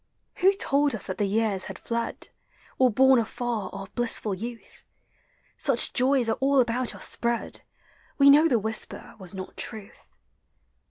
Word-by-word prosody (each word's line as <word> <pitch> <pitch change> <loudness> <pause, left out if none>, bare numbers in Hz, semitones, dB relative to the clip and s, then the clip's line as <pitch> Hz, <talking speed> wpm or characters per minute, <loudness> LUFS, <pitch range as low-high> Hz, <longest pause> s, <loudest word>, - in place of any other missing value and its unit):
Who 385 +2 +4
told 285 - +1
us 210 - -5
that 185 - -5
the 205 - +1
years 205 -2 0
had 190 - -7
iied, 235 0 -4 0.5
Or 255 -1 +5
borne 265 +2 +5
afar 230 -1 -3
our 195 0 -7
blissful 230 -3 -1
youth? 230 +5 -8 0.7
Such 270 -5 +2
joys 255 -1 +2
are 225 - -1
all 275 0 +3
about 245 0 0
us - - -3
spread; 235 0 -2 0.6
We 280 -1 +7
know 300 +3 +6
the 245 - +2
whisper 220 +1 -4
was 190 0 -6
not 185 0 -8
truth. 215 -4 -8
235 Hz, 155 wpm, -26 LUFS, 215-265 Hz, 0.7 s, We